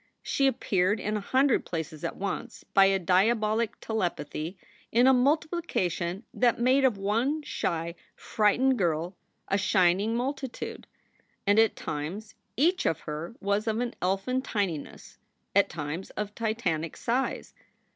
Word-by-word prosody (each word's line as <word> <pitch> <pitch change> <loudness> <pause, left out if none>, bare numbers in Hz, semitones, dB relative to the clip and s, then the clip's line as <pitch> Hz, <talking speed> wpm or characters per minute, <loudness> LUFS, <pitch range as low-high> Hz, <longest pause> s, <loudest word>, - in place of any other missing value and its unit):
She 275 - +2
appeared 205 -5 +1
in 210 +2 -2
a - - 0
hundred 260 +5 +2
places 160 -3 -5
at - - -3
once 195 +1 -5
by 195 - +4
a 195 0 +4
diabolic 215 +5 +2
telepathy 175 -4 -3 0.3
in 240 +2 +5
a 265 - +7
multiplication 250 - 0
that 240 -2 +2
made 260 +3 +4
of 250 -6 +3
one 230 +10 0
shy, 170 - -2 0.2
frightened 245 +5 +2
girl 170 0 0 0.3
a 195 - +1
shining 195 +2 +3
multitude. 265 +1 -4 0.6
And 205 +2 +4
at 225 0 +4
times 170 +9 -5 0.2
each 350 +8 +3
of 165 - 0
her 155 +8 -6
was 200 +3 0
of 220 0 0
an 245 -1 -2
elfin 195 +8 0
tininess, 195 - -4 0.4
at - - +5
times 150 +5 -5
of 210 0 -3
titanic 200 -9 -2
size. 250 +3 -1
210 Hz, 135 wpm, -28 LUFS, 180-245 Hz, 0.6 s, a